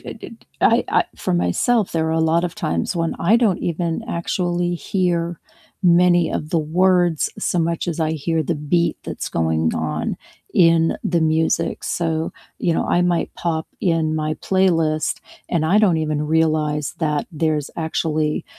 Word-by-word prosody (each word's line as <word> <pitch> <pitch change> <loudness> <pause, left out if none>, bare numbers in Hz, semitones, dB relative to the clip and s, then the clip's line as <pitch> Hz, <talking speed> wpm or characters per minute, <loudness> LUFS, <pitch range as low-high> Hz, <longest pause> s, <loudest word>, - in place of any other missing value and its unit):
d - - -10
d - - -14 0.2
I - - +4
I - - +3
for - - -2
myself, 90 - +1
there 160 -1 0
are - - 0
a 160 0 +2
lot 170 +1 +2
of 175 - -3
times 85 - -2
when 165 -1 -1
I 210 +7 +4
don't 220 -7 +2
even 170 +3 -2
actually 175 -2 -1
hear 175 -2 -1 0.4
many 175 -1 +4
of 150 - -4
the 170 - +2
words, 175 +1 +2
so 180 - -1
much 170 +1 -1
as 170 - -3
I 160 0 +1
hear 160 +1 -1
the 165 +3 -1
beat 160 +3 0
that's - - -5
going 80 -1 0
on 75 -1 -2 0.4
in 165 -2 +4
the 170 -1 +1
music. 160 +1 0
So, 160 -2 -1 0.3
you 170 - +1
know, - - 0
I 175 - +2
might 175 -1 0
pop 160 -2 -2
in 165 -3 +1
my 155 0 -1
playlist, 165 -4 +1 0.3
and 165 -3 0
I 185 +6 +4
don't 200 -6 +4
even 155 -1 -1
realize 155 -2 +1
that 150 -3 -1
there's 155 -2 -1
actually, 155 -1 -1
165 Hz, 170 wpm, -21 LUFS, 155-175 Hz, 0.4 s, I